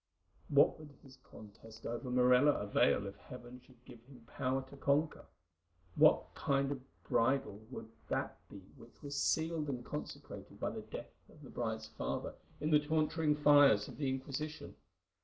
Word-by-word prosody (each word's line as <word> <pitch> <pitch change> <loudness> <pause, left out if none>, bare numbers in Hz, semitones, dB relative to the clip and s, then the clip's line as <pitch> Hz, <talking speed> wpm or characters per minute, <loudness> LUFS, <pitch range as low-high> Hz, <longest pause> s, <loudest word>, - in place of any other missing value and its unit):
What 145 0 +4
would 150 -2 -12
his 135 -1 -15
conquest 110 -1 -14
over 120 +2 -4
Morella 125 +3 +5
avail 105 -2 +2
if 100 0 -7
Heaven 125 0 -11
should 125 -1 -22
give 115 - -13
him 125 -3 -16
power 130 +2 -2
to - - -10
conquer? 140 +3 0 0.7
What - - +4
kind 140 0 0
of 140 - -3
a 130 - -27
bridal 115 -4 +1
would 115 -3 -7 0.2
that - - -2
be 100 - -10 0.2
which 120 - -17
was 145 0 -5
sealed 160 +1 0
and 125 -3 -4
consecrated 150 - -8
by - - -1
the - - -6
death - - -9 0.2
of - - -17
the - - -11
bride's 110 -2 -3
father - - -4 0.3
in 150 +2 -1
the 150 - +7
torturing 155 0 +1
fires 145 -8 +6
of - - -10
the 140 -3 -1
Inquisition? 140 +3 -5
135 Hz, 165 wpm, -35 LUFS, 120-145 Hz, 0.7 s, the